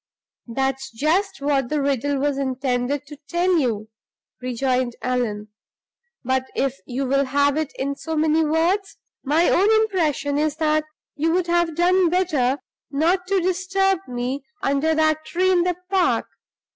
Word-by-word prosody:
"That's 270 +2 -2
just 310 - 0
what 275 -3 +1
the 305 - 0
riddle 280 0 0
was 280 0 0
intended 260 +1 -1
to 290 +1 -11
tell 350 0 +2
you!" 220 -6 -1 0.5
rejoined 255 0 -1
Allan. 225 -4 -1 0.7
"But 260 +1 0
if 275 0 -1
you 265 +2 -2
will 275 +2 +2
have 285 +1 +2
it 310 -2 -2
in 280 +1 -2
so 320 +2 -5
many 315 +1 +3
words, 335 +6 0 0.3
my 310 +5 +3
own 395 +4 +4
impression 330 -10 +1
is 305 -1 0
that 310 -1 +1 0.3
you 320 +3 +1
would 360 0 +1
have 345 -2 +1
done 360 +1 +3
better 305 -8 +1 0.3
not 340 +6 +1
to 390 -1 +2
disturb 380 +1 +1
me 250 +3 -3 0.2
under 285 +3 +1
that 310 0 +2
tree 365 +4 +1
in 360 -2 +4
the 355 0 0 0.2
park. 375 -2 +2
295 Hz, 150 wpm, -22 LUFS, 265-345 Hz, 0.7 s, own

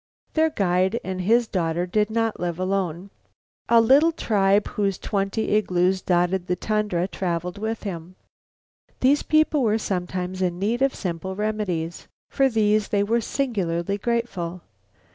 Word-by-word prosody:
Their 320 0 +3
guide 190 - +1
and 185 0 -4
his 230 +5 +3
daughter 175 -2 -1
did 210 +4 0
not 225 0 -1
live 175 -1 -2
alone. 185 -1 -2 0.6
A 235 - +6
little 275 +8 +5
tribe 205 -9 +2
whose 200 -2 -1
twenty 200 +2 -2
igloos 185 -2 +2
dotted 180 +1 +1
the 180 - +1
tundra 205 -3 -1
traveled 180 0 -3
with 220 +1 -3
him. 180 -3 -6 0.9
These 275 +3 +4
people 310 -1 +2
were 220 -3 +2
sometimes 185 -2 -3
in 175 -2 0
need 220 +6 -1
of 270 0 +2
simple 185 0 -4
remedies. 195 -6 -3 0.2
For 270 -1 +3
these 215 -2 +2
they 200 -1 +1
were 230 +3 +1
singularly 200 -8 -2
grateful. 195 -7 -2
195 Hz, 145 wpm, -24 LUFS, 180-225 Hz, 0.9 s, A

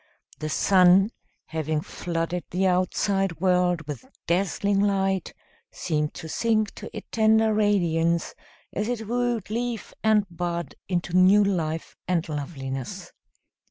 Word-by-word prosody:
The 155 - -3
sun, 185 +5 +5 0.3
having 155 -1 -2
flooded 170 +1 -3
the 185 +2 0
outside 185 0 +1
world 180 -2 +2
with 145 - -7 0.2
dazzling 195 +3 +1
light, 195 -2 0 0.3
seemed 150 -3 -2
to 160 - -7
sink 215 +3 0
to - - -8
a - - -6
tender 220 0 +4
radiance 170 -6 +1 0.4
as 210 +2 -1
it 225 -3 -3
wooed 240 -3 -1
leaf 235 -1 -3
and 215 -2 +4
bud 170 -2 -4 0.2
into 175 -1 -1
new 190 +3 +6
life 165 -5 -2
and 175 -3 0
loveliness. 135 -4 -5
185 Hz, 125 wpm, -25 LUFS, 165-205 Hz, 0.4 s, new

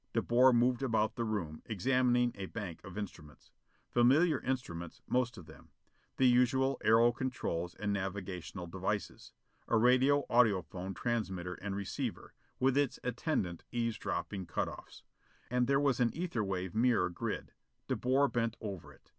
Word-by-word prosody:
De - - +2
Boer 125 +2 +5
moved 125 +1 +3
about 110 -4 +1
the 120 - -2
room, 95 -9 -3
examining 125 +3 +2
a 95 -1 -6
bank 95 -7 -6
of 95 -1 -9
instruments. 85 -8 -8 0.4
Familiar 140 +7 +4
instruments, 85 -11 -4
most 125 -1 0
of 90 - -10
them. 80 -2 -15 0.5
The 130 - +5
usual 130 +2 +3
aero 115 +2 +5
controls 120 -9 -3
and 105 0 -2
navigational 95 -2 -4
devices. 95 +4 -4 0.4
A 115 - +3
radio 130 +4 +4
audiphone 95 -5 +1
transmitter 95 -7 -2
and 100 +1 -5
receiver, 100 -1 -4 0.3
with 130 +1 +3
its 145 -4 0
attendant 120 - -2
eavesdropping 115 -5 -2
cut - - -1
offs. - - -10 0.5
And 125 -1 +2
there 140 0 +3
was 140 -4 +2
an 120 -2 +4
ether 160 -9 -2
wave 95 -2 -3
mirror 115 -4 +2
grid. 85 - -4 0.4
De - - 0
Boer 135 +3 +2
bent 115 -3 -1
over 100 -6 -6
it. - - -21
115 Hz, 150 wpm, -33 LUFS, 95-125 Hz, 0.5 s, Boer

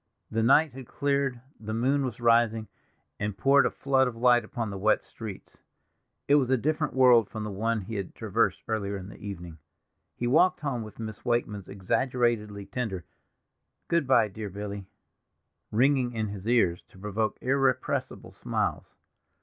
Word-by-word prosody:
The 115 - 0
night 140 +6 +4
had 130 -2 -9
cleared, 140 -3 0 0.2
the 110 0 -4
moon 135 +5 +2
was 125 -4 -4
rising, 115 -2 +3 0.5
and 105 -2 -3
poured 140 +4 +5
a - - 0
flood 135 -1 +2
of 120 - -4
light 120 0 +4
upon 110 0 -4
the 100 - -5
wet 110 +2 +2
streets. 110 -4 -9 0.7
It 140 - +4
was 130 - -2
a 130 - +4
different 150 +3 -1
world 125 -4 +6
from 110 - -5
the 105 - -4
one 110 +3 -1
he 100 +4 -8
had 100 -2 -5
traversed - - 0
earlier 100 -3 -2
in 95 0 -8
the - - -12
evening. 90 -5 -7 0.6
He 120 - -3
walked 175 +9 +4
home 135 -5 -2
with 110 -1 -9
Miss 110 -2 -7
Wakeman's 120 -5 -1
exaggeratedly 105 0 0
tender 100 -9 -4 0.8
"Good 170 -5 +2
by, 130 -4 +5
dear 105 +1 -6
Billy!" 100 0 -6 0.8
ringing 125 +1 +2
in 110 -2 -2
his 100 0 -7
ears, 110 -8 +3
to - - -18
provoke 105 +2 -2
irrepressible 130 -1 0
smiles. - - -3
115 Hz, 165 wpm, -28 LUFS, 105-130 Hz, 0.8 s, world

